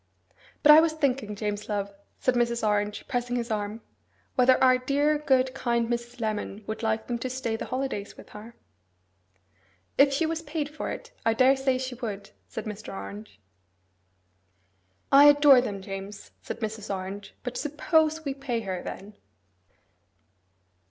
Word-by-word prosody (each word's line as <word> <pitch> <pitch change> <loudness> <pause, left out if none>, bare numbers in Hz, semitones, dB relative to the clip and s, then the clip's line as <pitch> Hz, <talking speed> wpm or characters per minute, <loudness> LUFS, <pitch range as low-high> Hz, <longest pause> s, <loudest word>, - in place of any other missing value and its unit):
'But 300 - +9
I 305 - +10
was 325 -1 +1
thinking, 270 -8 -1
James 210 0 -4
love,' 200 -1 -2 0.2
said 255 - +1
Mrs. 235 -2 +1
Orange, 210 0 -1
pressing 245 -1 -2
his 235 -1 -2
arm, 210 +1 -3 0.5
'whether 255 0 +5
our 255 -1 +5
dear, 285 +3 +1
good, 260 -3 +2
kind 235 -3 0
Mrs. 240 +1 -4
Lemon 215 -1 -3
would 220 +1 -5
like 220 -1 -1
them 240 -1 -3
to 255 - -3
stay 250 -3 -2
the - - -5
holidays 255 -6 -4
with - - -13
her.' 220 +3 -11 1.4
'If 275 0 +7
she 280 +4 +1
was 325 0 -2
paid 300 -1 -3
for 300 - -5
it, - - -7
I 225 0 +2
daresay 265 +1 +3
she 260 0 -4
would,' 210 -5 -6 0.2
said 220 - -6
Mr. 210 0 -7
Orange. 100 +1 -9 1.7
'I 280 +1 +8
adore 290 -3 +7
them, 200 -6 -5
James,' 195 +1 -8
said - - -7
Mrs. 215 -1 -4
Orange, 195 +1 -6
'but 250 0 -5
SUPPOSE 315 +1 +1
we 275 - -1
pay 270 -4 -3
her, 190 -4 -4
then! 200 +3 -8
240 Hz, 155 wpm, -27 LUFS, 210-270 Hz, 1.7 s, I